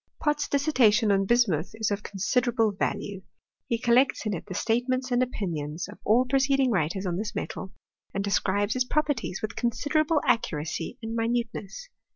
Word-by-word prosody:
Pott's 295 -1 0
dissertation 250 -7 +3
on 195 0 +2
bismuth 200 -9 +2
is 220 -2 -1
of 205 0 -1
considerable 225 +3 +1
value. 195 0 -3 0.5
He 235 - 0
collects 245 +2 +3
in 210 - 0
it 170 - -6
the 185 - -6
statements 255 +4 0
and 245 0 +3
opinions 170 -10 -3
of 205 - -12
all 240 +4 +4
preceding 270 0 +2
writers 185 0 0
on 175 -1 -1
this 210 +2 -4
metal, 190 - -5 0.4
and 195 - -2
describes 205 +1 +1
its 255 - +2
properties 255 -8 -1
with 215 - -3
considerable 290 +6 +1
accuracy 165 -2 -1
and 225 0 -4
minute 230 +1 0
ness. 215 - -8
225 Hz, 165 wpm, -27 LUFS, 195-255 Hz, 0.5 s, all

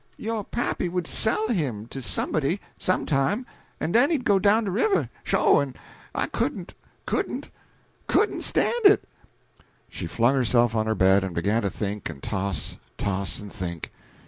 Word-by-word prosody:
Yo' 225 0 -2
pappy 205 -4 -2
would 180 -1 -2
sell 220 +4 0
him 135 - -1
to 135 +3 -7
somebody, 155 - 0 0.2
some 185 - 0
time, 165 - +1 0.3
en 160 - -1
den 245 - +5
he'd 290 -7 0
go 200 -2 +4
down 210 +4 +4
de 200 - -2
river, 390 - +1
sho', - - +4
en - - -2 0.4
I - - +1
couldn't, - - -3 0.3
couldn't, - - -2 0.6
couldn't - - +2
stan' - - +2
it." 400 +1 +7 0.9
She - - -5
flung 120 +3 +2
herself 120 -3 +3
on 110 -1 0
her 110 - +1
bed 95 0 +4
and 95 -3 -4
began 105 +7 +1
to 100 - 0
think 105 -1 -4
and 75 -4 -9
toss, 100 -1 -3 0.2
toss 95 -4 -2
and 105 -1 -9
think. 85 -6 -5
130 Hz, 165 wpm, -25 LUFS, -, 0.9 s, it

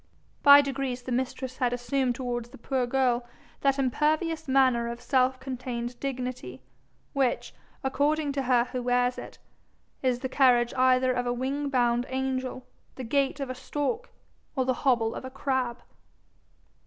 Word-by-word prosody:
By 285 0 +9
degrees 270 -3 -3
the 255 - -6
mistress 255 +1 -2
had 250 -3 +1
assumed 245 0 0
towards 240 -2 -3
the 270 - -13
poor 255 +1 -1
girl 250 -1 +1 0.4
that 275 0 +2
impervious 310 +4 0
manner 260 -3 +3
of 235 0 -5
self 255 0 +1
contained 250 -2 -5
dignity, 250 - -5 0.5
which, 270 -3 0 0.3
according 290 +2 +1
to 275 0 -1
her 250 -2 +3
who 250 - -2
wears 245 0 +1
it, - - -10 0.6
is 255 -2 +1
the 260 - -1
carriage 250 -3 +3
either 255 0 +3
of 245 0 -1
a 245 - +1
wing 275 +3 -2
bound 245 -2 +1
angel, 260 -1 -3 0.3
the 260 - -6
gait 275 +3 0
of 275 -2 -3
a - - -3
stork, 290 - -3 0.5
or 260 -2 +1
the 255 - +2
hobble 235 -5 +2
of - - -7
a 260 - -6
crab. 260 -3 -2
255 Hz, 155 wpm, -27 LUFS, 245-270 Hz, 0.6 s, By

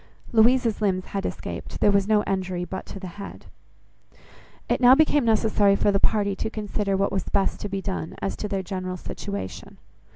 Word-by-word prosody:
Louisa's 230 0 +4
limbs 185 -3 +1
had 195 -1 -3
escaped. - - -6
There 205 - +4
was 200 0 +2
no 215 -1 +3
injury 185 -2 -2
but 185 +2 -6
to 195 - -8
the 190 - -7 0.2
head. 200 - -9 1.2
It - - 0
now 250 +1 +8
became 295 -1 +3
necessary 215 -2 +3
for 205 - +2
the 195 - +2
party 200 -1 +1
to 220 - -2
consider 205 -2 -2
what 195 +1 +1
was 190 - -1
best 195 -1 0
to 205 - -5
be 195 -1 -3
done, 185 -5 -4
as 195 - -2
to 210 - -3
their 195 -2 -2
general 185 -1 -4
situation. 100 - -6
200 Hz, 190 wpm, -25 LUFS, 190-215 Hz, 1.2 s, now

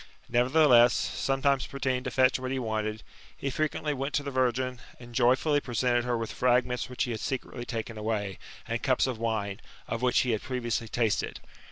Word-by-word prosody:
Nevertheless, 125 -1 +5
sometimes 135 0 0
pretending 130 -2 -1
to - - 0
fetch 130 +1 +3
what 130 0 -4
he 135 - -1
wanted, 110 -3 -2 0.3
he 135 - -3
frequently 150 +1 -1
went 135 +1 -3
to 145 - +1
the 140 - -4
virgin, 130 -1 0 0.2
and 120 -1 -12
joyfully 130 +5 +3
presented 120 -1 0
her 120 -1 0
with 115 -1 -4
fragments 125 0 +1
which 125 - -1
he 125 - -2
had 110 - -3
secretly 125 0 -4
taken 115 -2 -5
away, 105 -3 -2 0.3
and - - -2
cups - - +2
of 130 -4 -3
wine, 110 -4 -2 0.3
of 115 - -3
which 125 -1 +3
he 125 - 0
had 110 - 0
previously 120 -3 -2
tasted. 110 -2 -1
125 Hz, 185 wpm, -28 LUFS, 115-130 Hz, 0.3 s, Nevertheless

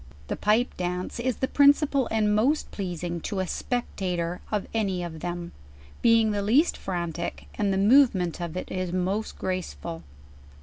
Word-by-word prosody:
The - - -1
Pipe 220 +4 +2
J.ance 180 +4 -3
is 250 0 0
the 265 - -1
principal 285 -1 +4
and 215 -2 +2
most 255 +9 +2
pleasing 175 -3 -4
to 195 - -3
a 185 - 0
spectator 180 -7 -2
of 210 -2 0
any 195 -5 0
of 165 -2 -6
them, 175 +1 -4 0.5
being 230 -2 +5
the 205 -1 -1
least 250 +12 +3
frantic, 170 -2 -4
and 205 -2 0
the 190 - +1
movement 200 - +4
of 170 0 -4
it - - -5 0.2
most 190 +4 -1
gracvful. 85 - -4
195 Hz, 150 wpm, -26 LUFS, 175-225 Hz, 0.5 s, being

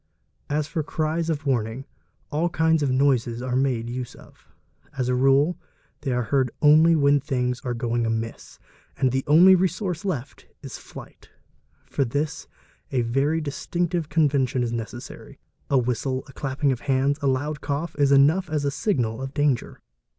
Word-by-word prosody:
As 150 +1 0
for 155 +1 -3
cries 160 +2 -2
of 150 -2 -2
warning, 120 -1 -1 0.5
all 160 +4 0
kinds 160 -1 +2
of 140 - +1
noises 130 -3 +1
are 125 -1 -2
made 130 -3 0
use 125 0 -5
of; - - -18 0.5
as 125 -1 -1
a - - +2
rule 135 +6 +3 0.4
they 140 -2 -3
are 125 0 0
heard 130 +1 +1
only 155 +3 +6
when 145 -1 +4
things 125 -3 -2
are 125 -1 -2
going 120 -1 -1
amiss 115 0 -4 0.4
and 130 - +2
the 135 +1 -1
only 175 +6 +7
resource 185 -1 0
left 150 -10 -5 0.2
is - - -8
flight: - - -13 0.6
for 140 - -1
this 145 +5 -3 0.4
a 130 - +1
very 135 +7 +1
distinctive 165 +2 -2
convention 140 -5 +1
is 120 - -2
necessary, 115 +1 -7 0.3
a 140 - +3
whistle, 130 +1 -1
a 135 - -14
clapping 135 +1 -1
of 125 - -2
the - - -16
hands, 140 +1 +1
a 140 - 0
loud 145 +3 -1
cough, 145 +4 -3
is 140 -1 +3
enough 155 +7 +4
as 150 -2 -1
a 140 - +1
signal 125 - -1
of 135 +1 -6
danger. 145 -4 0
140 Hz, 170 wpm, -24 LUFS, 125-155 Hz, 0.6 s, only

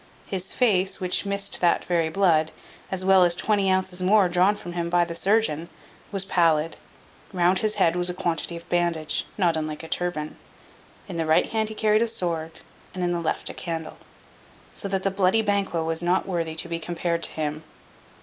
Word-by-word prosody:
His 190 -1 -4
face, 195 -6 +1
which 185 +2 0
missed 200 0 0
that 175 -1 +2
very 170 -2 +1
blood, 160 -3 +2 0.4
as 185 -1 -2
well 190 -1 +6
as 175 -1 +4
twenty 200 0 +1
ounces 185 -1 0
more 195 +1 +4
drawn 185 +4 +3
from 175 -4 -8
him 170 -1 -2
by 175 0 +3
the 170 - -6
surgeon, 170 -4 +1 0.4
was 195 -2 +1
pallid. 165 -4 +2 0.6
Round 180 0 +2
his 215 -1 0
head 175 -4 +2
was 180 0 +3
a 180 - -4
quantity 170 -1 -2
of 170 - -13
bandage, 170 -3 0
not 175 -5 +2
unlike 155 0 -4
a - - -7
turban. 160 -3 -3 0.7
In 180 -4 -6
the 165 -1 -1
right 155 - +4
hand 220 -1 0
he 220 - -7
carried 215 0 +2
a 235 - +2
sword, 165 -6 -3 0.3
and 185 - -3
in 175 - +1
the 175 - -1
left 165 - -2
a - - -11
candle. 165 -2 -5 0.8
So - - -4
that 195 -1 -2
the 195 - +1
bloody 195 +3 +2
Banquo 200 -5 0
was 160 0 0
not 175 +2 +1
worthy 165 -4 -2
to 165 - -1
be 170 0 -3
compared 170 0 -2
to - - 0
him. 155 0 -4
175 Hz, 200 wpm, -24 LUFS, 165-195 Hz, 0.8 s, well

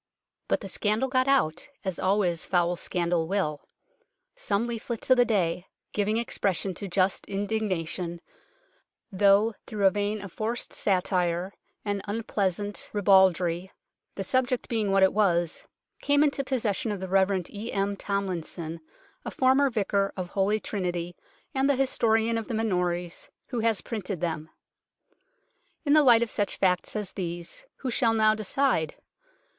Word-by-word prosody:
But - - +1
the 200 - -6
scandal 215 +6 0
got 255 0 +2
out, 175 - +2 0.2
as 190 -3 -2
always 185 -3 +1
foul 175 -1 +1
scandal 170 -1 -1
will. 165 -6 -1 0.7
Some 225 - 0
leaflets 235 +1 -4
of 255 - +7
the 245 - +5
day, 180 -5 0 0.3
giving 210 +1 +1
expression 195 -4 -1
to 200 +3 -6
just 185 +1 0
indignation, 190 -4 -2 0.9
though 200 +3 +4
through 210 -3 -1
a 190 - +7
vein 205 +2 -1
of 200 -2 -8
forced 225 +5 -3
satire 180 -1 0 0.3
and 205 -1 -1
unpleasant 205 -2 -2
ribaldry, 190 -3 +3 0.4
the 195 - -3
subject 255 +3 0
being 220 -3 0
what 195 0 +4
it 190 - +4
was, 175 -6 +1 0.4
came 285 +1 +4
into 280 -2 +1
possession 230 -5 -1
of 205 - -3
the 190 - -5
Rev. 190 0 +2
E. 215 +3 -6
M. 200 0 0
Tomlinson, 175 -5 -4 0.4
a - - -4
former 265 +2 +3
vicar 200 -3 0
of 180 -1 -4
Holy 200 +3 +1
Trinity 175 -4 -3 0.4
and 270 +1 +2
the 280 - +4
historian 230 -3 +2
of 225 - -7
the 230 - -3
Minories, 180 -5 -1 0.2
who 245 - -2
has 225 -2 +1
printed 200 -5 -4
them. 160 -2 -3 1.4
In 285 - +3
the 305 - +7
light 240 -4 +6
of 235 - -4
such 205 - -1
facts 180 +1 +1
as 210 -3 -3
these, 175 - -5 0.2
who 260 - -2
shall 230 -1 +2
now 215 -1 +4
decide 215 - 0
200 Hz, 150 wpm, -27 LUFS, 180-225 Hz, 1.4 s, of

